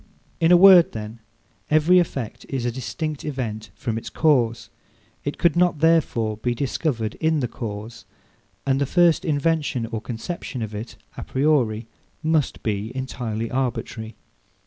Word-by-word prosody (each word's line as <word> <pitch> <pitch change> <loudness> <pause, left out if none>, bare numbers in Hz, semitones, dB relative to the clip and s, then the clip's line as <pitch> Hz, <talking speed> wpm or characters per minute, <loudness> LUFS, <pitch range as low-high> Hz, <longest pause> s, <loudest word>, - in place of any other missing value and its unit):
In 165 0 +4
a 175 - +9
word, 185 -2 +8
then, 110 +1 -7 0.5
every 155 +4 +5
effect 125 -8 -3
is 130 -3 -2
a 120 - 0
distinct 145 +4 -4
event 115 -7 -4
from 115 +2 -3
its - - -8
cause. 125 -7 +1 0.5
It 145 - -3
could 170 -2 +3
not, 175 -2 +3
therefore, 145 -9 +2
be 120 +2 -1
discovered 120 -3 -2
in 160 -1 +2
the 125 - -1
cause, 115 -1 -7 0.6
and 135 0 +1
the 140 - +1
first 175 0 +4
invention 145 -4 0
or 115 -1 -5
conception 125 +2 -5
of 110 -1 -6
it, 105 +3 -6 0.2
a - - -5
priori, 130 -6 +1 0.4
must 155 -3 0
be 105 +1 -2
entirely 115 -4 -4
arbitrary. 115 -3 -3
130 Hz, 145 wpm, -23 LUFS, 115-155 Hz, 0.6 s, a